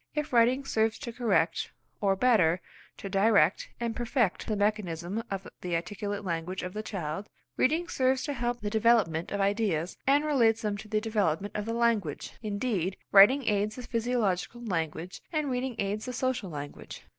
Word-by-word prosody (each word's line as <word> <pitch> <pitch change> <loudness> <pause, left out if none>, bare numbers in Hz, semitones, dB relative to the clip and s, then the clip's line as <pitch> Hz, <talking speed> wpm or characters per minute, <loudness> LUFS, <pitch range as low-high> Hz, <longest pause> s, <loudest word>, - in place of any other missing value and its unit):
If 300 -2 -2
writing 245 +3 +4
serves 225 -3 +1
to 235 -5 -7
correct, 235 -2 +1 0.3
or 195 -2 +3
better, 190 -7 +3 0.4
to - - -6
direct 195 -3 +3
and 235 -1 -2
perfect 240 -4 0
the 215 - 0
mechanism 205 -2 -1
of 195 -1 -4
the 175 -2 -2
articulate 205 +4 -4
language 170 +1 -3
of 180 0 -5
the 215 - -3
child, 195 -2 -5 0.3
reading 325 +6 +2
serves 260 -4 +1
to 290 - -2
help 240 -2 -2
the 205 0 -3
development 215 -8 +2
of 200 - -2
ideas, 195 -5 0
and 285 +2 +4
relates 230 -7 +3
them 210 -1 0
to 215 - -9
the 215 0 0
development 205 -4 -1
of 210 - -2
the 230 - -1
language. 230 -10 0
Indeed 200 -4 -1
writing 230 +7 +7
aids 210 0 +1
the 250 - -7
physiological 230 -2 -1
language 165 -2 -3
and 305 -4 -1
reading 250 0 -2
aids 205 +2 -2
the 250 - -4
social 255 -5 -1
language. 145 -2 -8
215 Hz, 170 wpm, -29 LUFS, 190-240 Hz, 0.4 s, writing